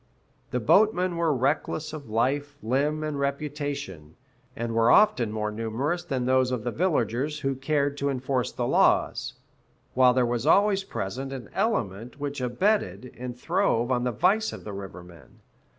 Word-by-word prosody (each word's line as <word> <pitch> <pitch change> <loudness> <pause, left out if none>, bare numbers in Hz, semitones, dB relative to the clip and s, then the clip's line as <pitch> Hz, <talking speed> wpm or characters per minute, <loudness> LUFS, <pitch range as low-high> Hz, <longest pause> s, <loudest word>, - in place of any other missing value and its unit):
The 125 - -1
boatmen 185 - +3
were 170 -1 +1
reckless 150 +3 -1
of 145 -6 -8
life, 140 +6 0
limb, 145 +6 0
and 150 -2 -3
reputation, 140 - -4 0.4
and 115 -3 -3
were 115 +1 +3
often 125 - +4
more 105 0 -2
numerous 115 +11 -2
than 135 -7 -2
those 130 0 +3
of 125 -4 -2
the 120 - -2
villagers 150 - 0
who 135 0 0
cared 140 +1 -1
to 140 - 0
enforce 130 -1 -1
the - - -3
laws; - - +2 0.6
while 125 -1 +5
there 130 -1 +3
was 120 +3 -2
always 195 +3 +4
present 135 - -5
an 130 -3 -8
element 120 - -2
which 140 -1 -4
abetted 125 - 0
and 125 0 -7
throve 120 0 +1
on 120 -1 +1
the 125 - 0
vice 200 - +2
of - - -9
the 105 - -7
river 95 -2 -8
men. 85 -7 -17
130 Hz, 165 wpm, -26 LUFS, 120-150 Hz, 0.6 s, while